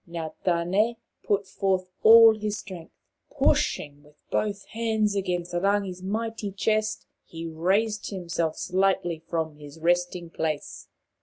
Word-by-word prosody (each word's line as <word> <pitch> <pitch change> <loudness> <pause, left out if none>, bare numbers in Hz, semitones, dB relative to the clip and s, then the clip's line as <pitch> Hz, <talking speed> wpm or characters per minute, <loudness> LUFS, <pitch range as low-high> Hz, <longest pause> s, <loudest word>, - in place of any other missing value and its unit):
Now 165 -2 -5
Tane 185 +7 +1 0.3
put 200 -1 +1
forth 190 -1 0 0.2
all 225 0 +9
his 210 0 -3
strength. 185 -5 -9 0.4
Pushing 145 0 0
with 150 0 -21 0.2
both 205 -1 -1
hands 220 -2 0
against 180 -3 -2
Rangi' 195 +2 +1
s 180 0 -10
mighty 220 +1 -3
chest, 215 +2 0 0.2
he 165 0 -8
raised 195 +7 0
him 185 -3 -6
slightly 170 +1 0
from 160 -3 -2
his 145 0 -12
resting 175 0 0
place. 155 -3 -4
185 Hz, 130 wpm, -26 LUFS, 170-210 Hz, 0.4 s, all